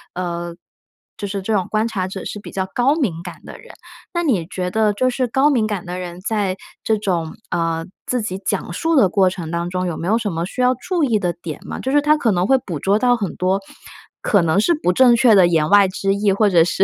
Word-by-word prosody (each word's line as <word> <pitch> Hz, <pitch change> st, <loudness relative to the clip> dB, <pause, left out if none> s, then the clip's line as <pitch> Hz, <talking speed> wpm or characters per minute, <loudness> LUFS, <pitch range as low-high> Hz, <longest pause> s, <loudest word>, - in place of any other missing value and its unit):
呃， 175 Hz, -1 st, -4 dB, 0.6 s
就 205 Hz, -, -4 dB
是 200 Hz, 0 st, -4 dB
这 220 Hz, -, -1 dB
种 190 Hz, -4 st, 0 dB
观 215 Hz, +1 st, +1 dB
察 190 Hz, -5 st, -2 dB
者 190 Hz, 0 st, -7 dB
是 210 Hz, -, -5 dB
比 -, -, -10 dB
较 190 Hz, -1 st, -2 dB
高 260 Hz, +4 st, +2 dB
敏 205 Hz, -, -1 dB
感 175 Hz, -1 st, -7 dB
的 -, -, -10 dB
人。 -, -, -13 dB, 0.4 s
那 345 Hz, 0 st, 0 dB
你 215 Hz, -, +1 dB
觉 180 Hz, 0 st, -4 dB
得 215 Hz, 0 st, +2 dB
就 255 Hz, +5 st, +1 dB
是 255 Hz, 0 st, -1 dB
高 270 Hz, +5 st, +3 dB
敏 230 Hz, -6 st, +1 dB
感 205 Hz, -4 st, -4 dB
的 180 Hz, +1 st, -5 dB
人 175 Hz, -1 st, -7 dB
在 200 Hz, -2 st, -1 dB, 0.3 s
这 220 Hz, -, +1 dB
种， 175 Hz, -6 st, -2 dB, 0.2 s
呃， 165 Hz, -1 st, -1 dB, 0.2 s
自 250 Hz, -1 st, 0 dB
己 190 Hz, -2 st, -4 dB
讲 195 Hz, -2 st, -2 dB
述 330 Hz, -, 0 dB
的 260 Hz, -9 st, +5 dB
过 190 Hz, 0 st, +3 dB
程 170 Hz, -3 st, -6 dB
当 170 Hz, 0 st, -2 dB
中 185 Hz, 0 st, -2 dB
有 175 Hz, -3 st, -3 dB
没 170 Hz, -, -4 dB
有 220 Hz, +3 st, +3 dB
什 220 Hz, -4 st, -2 dB
么 165 Hz, 0 st, -2 dB
需 230 Hz, +7 st, -4 dB
要 250 Hz, 0 st, +4 dB
注 355 Hz, +5 st, -2 dB
意 230 Hz, -6 st, +2 dB
的 175 Hz, -3 st, -1 dB
点 160 Hz, -4 st, -5 dB
吗？ -, -, -5 dB
就 265 Hz, -, -2 dB
是 290 Hz, +1 st, +4 dB
他 300 Hz, +1 st, +3 dB
可 240 Hz, -7 st, +1 dB
能 180 Hz, -1 st, +1 dB
会 265 Hz, -, +5 dB
捕 170 Hz, -, -6 dB
捉 195 Hz, +7 st, +2 dB
到 245 Hz, +1 st, +3 dB
很 205 Hz, -6 st, -4 dB
多 185 Hz, +2 st, 0 dB, 0.6 s
可 205 Hz, -, +3 dB
能 165 Hz, +3 st, +2 dB
是 280 Hz, +11 st, +3 dB
不 180 Hz, -, 0 dB
正 245 Hz, +2 st, +6 dB
确 235 Hz, -1 st, +5 dB
的 185 Hz, -3 st, +6 dB
言 160 Hz, -3 st, +2 dB
外 205 Hz, -1 st, +6 dB
之 195 Hz, +1 st, -1 dB
意， 200 Hz, 0 st, +1 dB
或 210 Hz, +2 st, +3 dB
者 170 Hz, -4 st, +5 dB
是 175 Hz, +3 st, +1 dB
195 Hz, 275 characters per minute, -20 LUFS, 180-230 Hz, 0.6 s, 正